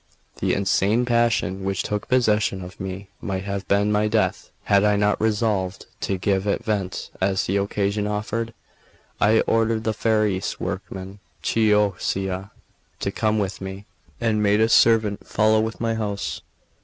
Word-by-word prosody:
The - - +1
insane 100 +4 +2
passion 115 -5 +1
which 95 -1 -1
took 105 0 -3
possession 105 -6 +2
of 90 +1 -11
me 95 +1 -6
might 95 -1 -3
have 100 0 -4
been 100 +1 +2
my 105 0 +2
death, 110 0 0
had 100 0 +3
I 105 0 +4
not 105 0 +1
resolved 105 -4 0
to 95 - -1
give 95 +1 0
it 100 - 0
vent 100 -4 -2
as 95 0 +1
the 95 - 0
occasion 100 +1 0
offered. 110 +2 -3 0.6
I 110 +2 +4
ordered 115 0 +1
the 110 - 0
Ferrarese 105 -3 0
workman, 95 +1 -5 0.2
Chioccia, 100 -3 +1 0.5
to 100 - -2
come 110 +1 0
with 100 -2 -2
me, 95 +1 -7 0.3
and 110 -2 +1
made 105 0 +3
a 110 +1 +3
servant 110 -3 +4
follow 110 0 +3
with 110 +1 -2
my 115 -1 0
horse. 105 -3 -3
105 Hz, 155 wpm, -23 LUFS, 95-110 Hz, 0.6 s, I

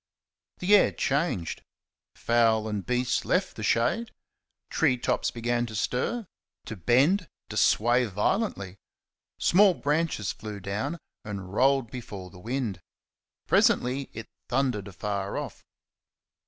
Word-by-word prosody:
The 195 +3 +4
air - - +5
changed. 140 - -1 0.5
Fowl 115 -2 +2
and 105 -2 -3
beast 125 0 0
left 185 +1 0
the - - -7
shade; 120 - +1 0.6
tree 140 -6 +2
tops - - 0
began 120 0 -1
to 110 - -8
stir 210 - -1 0.4
to 110 - -6
bend 140 - +3 0.2
to - - -6
sway 120 +3 +4
violently. 105 - -1 0.6
Small 190 0 +5
branches 150 -8 0
flew 105 -2 -7
down 105 - -3 0.3
and 100 -3 -7
rolled 135 0 +2
before 100 -7 -8
the 90 - -13
wind. 115 -3 -3 0.6
Presently 130 +2 +2
it 115 0 -8 0.2
thundered 125 -6 0
afar 100 +1 -3
off. - - -6
120 Hz, 120 wpm, -27 LUFS, 105-140 Hz, 0.6 s, air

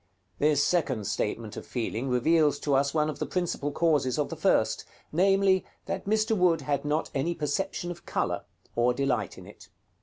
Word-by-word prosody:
This 145 -1 +3
second 135 - 0
statement 105 +1 -2
of - - -6
feeling 120 +1 -3
reveals 150 +4 +3
to 145 - 0
us 140 +1 +3
one 150 0 +1
of 155 - -4
the - - -1
principal 175 -5 -2
causes 150 -5 +1
of 150 - 0
the - - -5
first; - - +2 0.3
namely, 190 +2 +3 0.2
that 195 0 -4
Mr. 220 +2 +2
Wood 175 -5 +3
had 140 0 -1
not 150 +2 -1
any 165 +6 0
perception 175 +4 -2
of 175 - -10
color, - - -1 0.3
or 120 +1 +2
delight 125 -7 -1
in - - -11
it. - - -14
150 Hz, 180 wpm, -28 LUFS, 135-175 Hz, 0.3 s, This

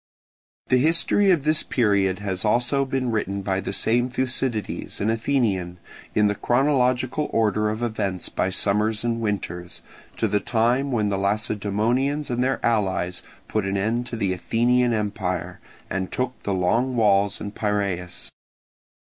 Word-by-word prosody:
The 125 - +4
history 165 +7 +3
of 170 -7 +3
this 155 +1 +2
period 100 -6 +1
has 95 -3 -3
been 105 - +2
also 125 +3 +2
written 115 -7 -1
by 95 -1 0
the 95 - -4
same 120 +5 +1
Thucydides, 125 -3 -2
an 105 +2 +1
Athenian, 110 -7 0 0.4
in 105 - +4
the 105 - +2
chronological 130 +3 +1
order 105 -1 +1
of 110 +2 -3
events 100 -5 -2
by 95 - -1
summers 105 +3 +1
and 115 -1 -1
winters, 90 -5 -4 0.3
to 110 - +1
the 105 0 +1
time 120 +5 +1
when 110 -4 +1
the 100 -1 -1
Lacedaemonians 110 +7 0
and 120 +1 0
their 135 +1 0
allies 95 -6 0 0.3
put 110 - -1
an 100 0 -1
end 115 +5 -1
to 120 - -5
the 100 -4 0
Athenian 120 +6 +2
empire, 105 -5 -2 0.3
and 95 -1 -3
took 125 0 -1
the 100 - -2
Long 115 +8 +1
Walls 100 -3 +3
and 100 0 -6
Piraeus. 100 -5 -2
110 Hz, 150 wpm, -24 LUFS, 100-125 Hz, 0.4 s, The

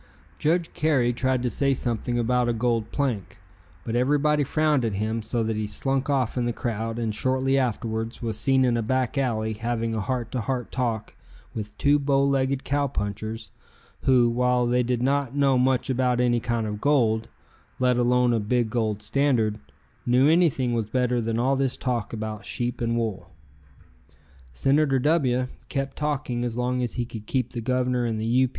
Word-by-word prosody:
Judge 165 +2 +1
Carey 135 -6 +2
tried 130 0 0
to 125 - +1
say 140 +4 +1
something 120 -1 -2
about 120 +1 +1
a - - +1
gold 115 -1 -1
plank, 125 -9 -2 0.5
but 115 - -3
everybody 145 +4 +2
frowned 150 -1 +1
at 110 -4 -1
him 110 +3 -1
so 115 +2 -1
that 110 0 -1
he 105 0 -2
slunk 135 +6 -1
off 130 -3 0
in 120 - 0
the - - +1
crowd 115 -1 -3
and 115 -2 -1
shortly 130 +4 +1
afterwards 115 -3 -1
was 115 -3 -3
seen 130 +4 +3
in 120 -2 +2
a 115 - 0
back 130 +2 0
alley 110 -5 0
having 115 +1 -2
a 110 - -1
heart 120 +2 -3
to 125 - -2
heart 125 +2 -3
talk 115 -4 -2 0.4
with 105 -1 -6
two 145 +1 +3
bow 140 -1 +2
legged 135 -1 +1
cowpunchers 110 -6 -3 0.5
who, 125 -2 +5
while 125 +1 +2
they 125 +1 +2
did 125 0 -1
not 140 -1 0
know 140 -2 +3
much 125 0 +2
about 125 -2 +1
any 120 -1 +2
kind 115 -1 -1
of 105 0 -5
gold, 115 -6 +2 0.5
let 125 -1 +2
alone 125 0 +3
a 115 - +2
big 110 +1 0
gold 110 -3 -1
standard, 115 -3 +1 0.4
knew 125 +3 +4
anything 155 -7 +3
was 115 -3 -1
better 125 +1 0
than 115 0 -1
all 130 +3 +2
this 135 -1 0
talk 120 -4 -2
about 110 -2 -5
sheep 120 0 -2
and 115 0 0
wool. 105 -6 -3 1.2
Senator 135 - +2
W 130 -3 +2 0.2
kept 135 -1 -3
talking 145 -5 -2
as 120 -1 -3
long 125 +1 0
as 120 -2 -2
he 120 - -2
could 110 -2 -9
keep 125 -3 -1
the 120 - -4
Governor 125 0 0
and 110 -2 -1
the 110 - -2
U. 125 +3 +3
125 Hz, 185 wpm, -25 LUFS, 115-130 Hz, 1.2 s, who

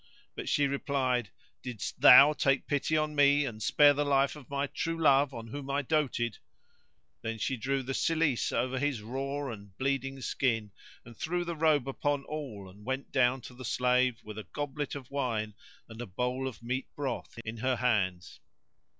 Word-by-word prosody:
But - - -5
she 145 - +3
replied, 130 -5 0 0.3
"Didst 120 -6 -6
thou 145 +2 +10
take 135 -2 +1
pity 145 +2 0
on 155 0 0
me 145 0 +5
and 110 -4 -6
spare 145 +5 +5
the 145 +1 0
life 140 0 +2
of 145 -4 -13
my 140 0 -1
true 165 +3 -3
love 140 -2 +4
on 115 -3 -8
whom 140 +2 -7
I 140 +1 0
coated?" 125 -6 0 0.8
Then 115 0 -4
she 130 +5 -1
drew 135 +3 -1
the 135 +2 -4
cilice 160 -4 +1
over 130 +1 -1
his 140 -6 -1
raw 135 +3 -3
and 100 -3 -11
bleeding 135 0 -1
skin 115 -5 -1 0.3
and 115 0 -12
threw 175 +8 -2
the 170 -1 -3
robe 155 -4 +2
upon 140 +1 -1
all 135 -12 -6
and 100 +3 -15
went 130 +4 -4
down 130 -1 +2
to 125 - -11
the 130 +1 -10
slave 125 0 +2
with 105 0 -8
a - - -6
goblet 145 0 -3
of 135 -4 -9
wine 115 -6 -2 0.3
and 115 +1 -9
a 120 - -6
bowl 125 +7 -2
of 120 -2 -8
meat 130 +3 -2
broth 135 -5 -4
in 110 +1 -5
her 130 +3 0
hands. 105 -8 -1
130 Hz, 185 wpm, -30 LUFS, 120-145 Hz, 0.8 s, thou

